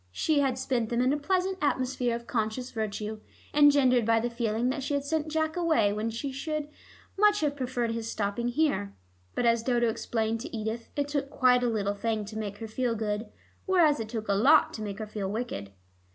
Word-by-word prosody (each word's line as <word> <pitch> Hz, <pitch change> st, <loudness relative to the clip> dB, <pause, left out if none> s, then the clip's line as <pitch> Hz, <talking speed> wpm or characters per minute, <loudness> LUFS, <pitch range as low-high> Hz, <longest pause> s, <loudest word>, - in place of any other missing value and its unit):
She 300 Hz, -, +1 dB
had 265 Hz, -3 st, +1 dB
spent 250 Hz, -3 st, -1 dB
them 235 Hz, -, 0 dB
in 255 Hz, +2 st, +3 dB
a -, -, +1 dB
pleasant 375 Hz, +4 st, 0 dB
atmosphere 255 Hz, -4 st, 0 dB
of 235 Hz, 0 st, -7 dB
conscious 235 Hz, +3 st, -2 dB
virtue, 215 Hz, -1 st, -3 dB, 0.3 s
engendered 280 Hz, -4 st, +5 dB
by 225 Hz, +1 st, +3 dB
the 240 Hz, +1 st, -2 dB
feeling 235 Hz, 0 st, 0 dB
that 275 Hz, +2 st, -2 dB
she 280 Hz, +2 st, -1 dB
had 280 Hz, 0 st, -2 dB
sent 315 Hz, +1 st, -1 dB
Jack 315 Hz, 0 st, -1 dB
away 315 Hz, -13 st, +2 dB
when 215 Hz, +2 st, -2 dB
she 265 Hz, +5 st, -4 dB, 0.2 s
would 305 Hz, -1 st, -2 dB, 0.5 s
much 415 Hz, 0 st, +5 dB
have 290 Hz, -2 st, 0 dB
preferred 250 Hz, -3 st, -2 dB
his 230 Hz, 0 st, -3 dB
stopping 205 Hz, +3 st, -2 dB
here. 245 Hz, -, 0 dB, 0.4 s
But -, -, 0 dB
as 230 Hz, -1 st, +4 dB
Dodo 240 Hz, -1 st, +2 dB
explained 225 Hz, 0 st, -1 dB
to 235 Hz, -, -6 dB
Edith 220 Hz, +2 st, -4 dB
it 285 Hz, -1 st, 0 dB
took 285 Hz, -1 st, -2 dB
quite 250 Hz, -3 st, +4 dB
a 245 Hz, -, +1 dB
little 205 Hz, -3 st, 0 dB
thing 215 Hz, 0 st, -2 dB
to 215 Hz, +2 st, -9 dB
make 205 Hz, -2 st, -4 dB
her 225 Hz, -, -6 dB
feel 235 Hz, +1 st, -1 dB
good, 210 Hz, 0 st, -2 dB, 0.4 s
whereas 335 Hz, -7 st, +4 dB
it 220 Hz, -1 st, -4 dB
took 220 Hz, -2 st, -4 dB
a 200 Hz, -, +2 dB
lot 270 Hz, +10 st, +5 dB
to 220 Hz, -, -6 dB
make 205 Hz, -2 st, -4 dB
her 215 Hz, -, -4 dB
feel 210 Hz, -2 st, -4 dB
wicked. 210 Hz, -, -4 dB
240 Hz, 210 wpm, -28 LUFS, 220-285 Hz, 0.5 s, engendered